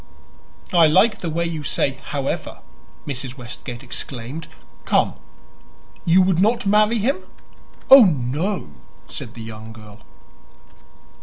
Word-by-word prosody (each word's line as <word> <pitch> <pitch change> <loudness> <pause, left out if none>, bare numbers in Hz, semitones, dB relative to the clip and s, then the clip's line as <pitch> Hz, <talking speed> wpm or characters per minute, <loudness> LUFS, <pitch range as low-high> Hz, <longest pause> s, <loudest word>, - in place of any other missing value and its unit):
"I 170 -2 +6
like 200 +7 +4
the 170 - -4
way 170 +2 -1
you 165 -2 -4
say 135 -1 -1
'however,'" 140 -2 -4 0.4
Mrs. 130 -2 -5
Westgate 120 0 -8
exclaimed. 130 +4 -6 0.4
"Come; - - +2 0.9
you 180 +2 +5
would 185 -2 +2
not 220 +3 +2
marry 210 +3 +3
him?" 265 - 0 0.7
"Oh, 270 -4 +11
no," 150 - -1 0.4
said - - -8
the 115 - -8
young 110 0 -9
girl. 105 -2 -14
155 Hz, 120 wpm, -21 LUFS, 125-190 Hz, 0.9 s, Oh